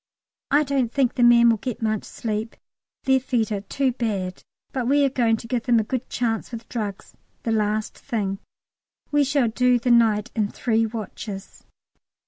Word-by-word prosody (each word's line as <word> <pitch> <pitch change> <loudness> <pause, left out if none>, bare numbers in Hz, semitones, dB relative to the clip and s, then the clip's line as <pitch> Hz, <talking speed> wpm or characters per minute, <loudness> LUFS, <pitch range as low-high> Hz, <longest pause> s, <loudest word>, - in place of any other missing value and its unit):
I 290 +2 +4
don't 270 -5 0
think 265 -3 +1
the - - -2
men 235 -1 +7
will 225 - +1
get 250 +2 -5
much 215 -2 -1
sleep, 220 0 -4 0.5
their 265 0 +4
feet 240 -4 -1
are 200 -2 -1
too 265 +6 0
bad, 200 -7 -3 0.3
but 255 -3 -1
we 285 +2 +4
are 270 - +1
going 230 -4 +2
to 230 - -9
give 240 -1 -2
them 240 -1 +5
a - - +1
good 255 +3 -4
chance 230 -1 -2
with 230 -1 -7
drugs, 210 -5 -5 0.3
the 230 - -1
last 215 0 0
thing. 200 -6 -2 0.7
We 290 0 +4
shall 275 -3 +2
do 250 +2 +3
the 245 +1 0
night 225 -1 +3
in 215 -3 +1
three 225 -1 +1
watches. 210 -2 -7
230 Hz, 180 wpm, -24 LUFS, 215-250 Hz, 0.7 s, men